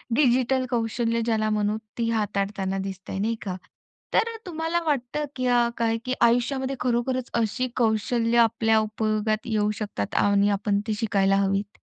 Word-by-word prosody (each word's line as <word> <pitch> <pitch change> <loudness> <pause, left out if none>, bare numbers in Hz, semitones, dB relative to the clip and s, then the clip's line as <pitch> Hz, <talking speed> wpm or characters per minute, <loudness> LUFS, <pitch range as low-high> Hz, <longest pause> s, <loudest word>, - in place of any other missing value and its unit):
Digital 255 -1 +3
कौशल्य 230 -1 0
ज्याला 220 -2 +1
म्हणू, 210 0 0 0.2
ती 230 -1 0
हाताळताना 200 -3 -1
दिसतंय, 195 0 -6
नाही 225 +3 0
का? 185 -2 -3 0.6
तर 460 0 +2
तुम्हाला 330 0 -1
वाटतं, 290 0 -1
की 255 -1 -1 0.3
काय, 230 -1 +1
की 255 - -1
आयुष्यामध्ये 260 +3 +2
खरोखरच 250 +1 -1
अशी 255 +4 -1
कौशल्य 230 0 +1
आपल्या 225 -1 +4
उपयोगात 215 0 -1
येऊ 210 -2 +1
शकतात 100 - -4
आणि 200 0 +3
आपण 200 0 +1
ते 215 - 0
शिकायला 195 -3 +2
हवीत? 195 +1 -1
225 Hz, 140 wpm, -25 LUFS, 205-245 Hz, 0.6 s, आपल्या